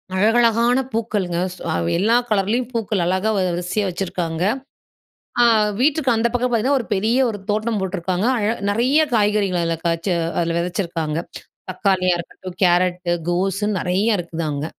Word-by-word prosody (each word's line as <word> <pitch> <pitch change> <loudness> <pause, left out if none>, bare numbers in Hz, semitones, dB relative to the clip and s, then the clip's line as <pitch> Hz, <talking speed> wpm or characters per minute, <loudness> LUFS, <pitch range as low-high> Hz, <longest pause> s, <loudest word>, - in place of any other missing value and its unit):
அழகழகான 230 +4 +3 0.2
பூக்களுங்க, 205 -6 -1 0.2
சோ - - -16
அவ் 85 -1 -1
எல்லா 220 +5 +3
கலர்லயும் 215 +4 0
பூக்கள், 215 -5 -1
அழகா 185 +4 0
வரிசையா 180 +2 -1
வச்சுருக்காங்க. 175 -2 -3 1.0
அ - - +7 0.4
வீட்டுக்கு 290 0 +2
அந்த 225 +1 +2
பக்கம் 245 +1 +1
பாத்தீங்கன்னா, 245 +5 +2
ஒரு 235 - -5
பெரிய 220 +5 +1
ஒரு 210 -2 -5
தோட்டம் 215 +1 0
போட்டுருக்காங்க. 185 +2 -1
அழ 210 -2 0 0.2
நிறைய 245 +8 +2
காய்கறிகள், 205 -4 +2
அதில 165 0 -1
காய்ச்சு, 170 +2 0 0.3
அதில 165 -1 0
விதைச்சிருக்காங்க. 170 -3 -2 0.5
தக்காளியா 185 -1 +1
இருக்கட்டும், 175 +1 -9
கேரட்டு, 180 0 +2 0.2
கோஸுன்னு 195 +3 0
நிறையா 190 +5 +1
இருக்குது 170 -1 -4
அங்க, 145 +1 -3
195 Hz, 140 wpm, -20 LUFS, 175-225 Hz, 1.0 s, அ